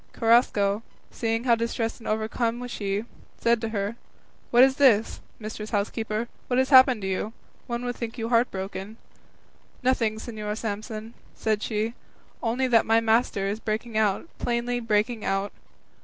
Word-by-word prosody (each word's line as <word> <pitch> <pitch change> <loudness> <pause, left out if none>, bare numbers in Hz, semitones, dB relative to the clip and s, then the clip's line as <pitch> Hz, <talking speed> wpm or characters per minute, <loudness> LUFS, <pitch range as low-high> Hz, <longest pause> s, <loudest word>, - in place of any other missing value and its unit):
Carrasco, 225 -3 +3 0.3
seeing 225 0 -1
how 245 -2 +4
distressed 230 0 -1
and 225 - -10
overcome 230 +3 -1
she 200 -4 -2
was, - - -12 0.3
said 235 -1 +2
to 225 - -2
her, 205 +1 -2 0.5
"What 245 +1 +7
is 265 0 +4
this, 230 -6 +4 0.2
mistress 215 -1 -6
housekeeper? 215 +2 -1 0.2
What 245 - 0
has 260 0 +2
happened 260 -5 +7
to - - -1
you? 190 +3 -2 0.3
One 240 0 -3
would 245 0 -3
think 230 -1 -5
you 225 -1 -3
heart 240 +1 +3
broken." 195 +2 -6 0.9
"Nothing, 235 -4 +2
Señor 215 -2 -5
Samson," 220 +1 -5 0.2
said 215 -1 0
she, 220 +1 -1 0.5
"only 240 +3 0
that 235 -3 +4
my 225 +1 +5
master 225 -3 +2
is 205 +2 -2
breaking 220 +1 -3
out, 215 - +1
plainly 240 0 -1
breaking 220 0 0
out." 195 +1 -1
225 Hz, 155 wpm, -26 LUFS, 215-235 Hz, 0.9 s, What